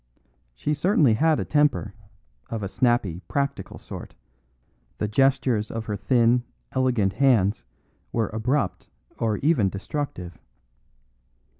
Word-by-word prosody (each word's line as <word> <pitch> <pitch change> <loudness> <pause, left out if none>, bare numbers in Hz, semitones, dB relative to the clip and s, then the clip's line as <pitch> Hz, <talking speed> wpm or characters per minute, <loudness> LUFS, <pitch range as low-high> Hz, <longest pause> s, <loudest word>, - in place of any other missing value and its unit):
She 150 - -1
certainly 150 - +3
had 155 +7 +3
a - - -2
temper, 145 -9 +1 0.6
of 110 -2 -4
a - - -1
snappy, 115 -6 +1
practical 140 0 -2
sort; - - -9 0.8
the 105 - -1
gestures 130 -2 +2
of 115 0 -5
her 105 - -2
thin, 120 +3 +3 0.3
elegant 125 -7 +1
hands 115 -8 +3 0.5
were 115 -2 0
abrupt 110 -1 -1 0.3
or 110 -2 0
even 140 -11 +3
destructive. 95 - -5
120 Hz, 115 wpm, -25 LUFS, 105-140 Hz, 0.8 s, certainly